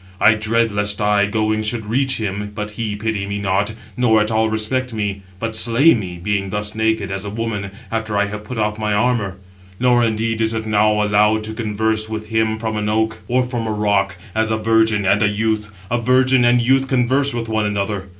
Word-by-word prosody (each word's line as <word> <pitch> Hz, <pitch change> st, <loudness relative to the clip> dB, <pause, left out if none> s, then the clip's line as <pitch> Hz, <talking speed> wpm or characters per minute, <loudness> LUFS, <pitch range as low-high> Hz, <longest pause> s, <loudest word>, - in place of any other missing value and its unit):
[I 110 Hz, -, +6 dB
dread] 110 Hz, +1 st, +1 dB
lest 105 Hz, 0 st, -1 dB
I, 105 Hz, -1 st, +2 dB
going, 110 Hz, +1 st, 0 dB
should 110 Hz, +1 st, -1 dB
reach 130 Hz, +5 st, 0 dB
him, 105 Hz, -1 st, -4 dB
but 105 Hz, -1 st, -4 dB
he 105 Hz, -1 st, -3 dB
pity 105 Hz, -2 st, -2 dB
me 100 Hz, 0 st, -3 dB
not, 100 Hz, +2 st, 0 dB, 0.2 s
nor 120 Hz, -3 st, +3 dB
at 105 Hz, +1 st, 0 dB
all 110 Hz, 0 st, +2 dB
respect 115 Hz, +3 st, -1 dB
me, 100 Hz, -2 st, -3 dB, 0.2 s
but 115 Hz, -1 st, -3 dB
slay 120 Hz, +8 st, +5 dB
me, 95 Hz, -6 st, -4 dB
being 100 Hz, +2 st, -2 dB
thus 105 Hz, +1 st, -3 dB
naked, 110 Hz, -3 st, 0 dB
as 95 Hz, 0 st, -3 dB
a 100 Hz, -, -5 dB
woman, 105 Hz, -2 st, -3 dB, 0.2 s
after 110 Hz, -2 st, -2 dB
I 105 Hz, -, +3 dB
have 105 Hz, +1 st, -6 dB
put 125 Hz, +3 st, -7 dB
off 105 Hz, 0 st, -1 dB
my 105 Hz, -1 st, 0 dB
armour. 110 Hz, -4 st, 0 dB, 0.4 s
Nor, 125 Hz, -1 st, +3 dB
indeed, 115 Hz, 0 st, 0 dB
is 110 Hz, 0 st, +1 dB
it 110 Hz, 0 st, -3 dB
now 105 Hz, 0 st, +2 dB
allowed 105 Hz, +1 st, +2 dB
to 110 Hz, 0 st, -5 dB
converse 110 Hz, 0 st, -1 dB
with 110 Hz, -1 st, -5 dB
him 110 Hz, -1 st, +1 dB
from 110 Hz, -1 st, -3 dB
an 105 Hz, 0 st, -1 dB
oak, 110 Hz, +1 st, 0 dB
or 125 Hz, +1 st, +2 dB
from 120 Hz, -2 st, -3 dB
a -, -, -1 dB
rock, 100 Hz, -2 st, 0 dB, 0.2 s
as 110 Hz, 0 st, 0 dB
a 110 Hz, -, 0 dB
virgin 110 Hz, -1 st, +2 dB
and 100 Hz, +3 st, +3 dB
a 105 Hz, -, +4 dB
youth; 105 Hz, 0 st, -1 dB, 0.2 s
a 120 Hz, -, +1 dB
virgin 130 Hz, +1 st, +3 dB
and 120 Hz, +1 st, +4 dB
youth 135 Hz, +2 st, +2 dB
converse 135 Hz, +2 st, +2 dB
with 120 Hz, -2 st, -3 dB
one 110 Hz, -1 st, 0 dB
another. 100 Hz, -1 st, -2 dB
110 Hz, 215 wpm, -19 LUFS, 105-115 Hz, 0.4 s, I